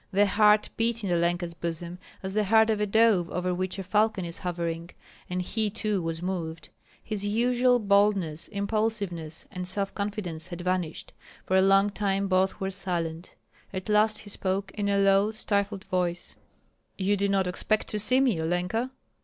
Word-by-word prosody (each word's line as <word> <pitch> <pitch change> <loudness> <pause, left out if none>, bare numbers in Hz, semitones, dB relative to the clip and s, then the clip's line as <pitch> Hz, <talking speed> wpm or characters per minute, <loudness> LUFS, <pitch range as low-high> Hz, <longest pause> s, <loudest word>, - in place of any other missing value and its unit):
The 200 +1 +4
heart 210 +1 +4
beat 230 0 +1
in 195 - -1
Olenka's 175 0 0
bosom 170 +1 -5 0.2
as 190 0 -4
the 210 0 +1
heart 220 +2 +5
of 210 -1 -1
a 210 - +1
dove 205 -5 +3
over 180 0 -1
which 185 +1 -2
a 195 - -4
falcon 210 0 +1
is 170 0 -4
hovering, 170 -1 -3 0.4
and 180 0 -2
he 215 +3 -1
too 210 -2 -1
was 165 0 -3
moved. 170 -3 -4 0.3
His 210 -2 -4
usual 245 +4 +3
boldness, 200 -6 +2
impulsiveness, 200 -6 -2
and 180 0 -5
self 195 +1 -1
confidence 200 -6 -4
had 175 -1 -7
vanished. 180 -3 -2 0.3
For 190 - +1
a 190 - +6
long 195 +1 +4
time 200 -1 0
both 190 +1 +1
were 190 -1 -2
silent. 175 -3 -3 0.4
At 185 +1 -5
last 215 +1 +3
he 205 - -11
spoke 195 0 -2
in 205 -1 -1
a 200 - +2
low, 195 +1 +4
stifled 200 -2 -1
voice, 180 -2 -2 0.6
"You 200 +1 +1
did 200 0 0
not 195 -1 +2
expect 195 +4 -1
to 210 - -2
see 250 +5 +3
me, 240 -12 +2
Olenka?" 180 +9 -1
195 Hz, 175 wpm, -27 LUFS, 180-210 Hz, 0.6 s, a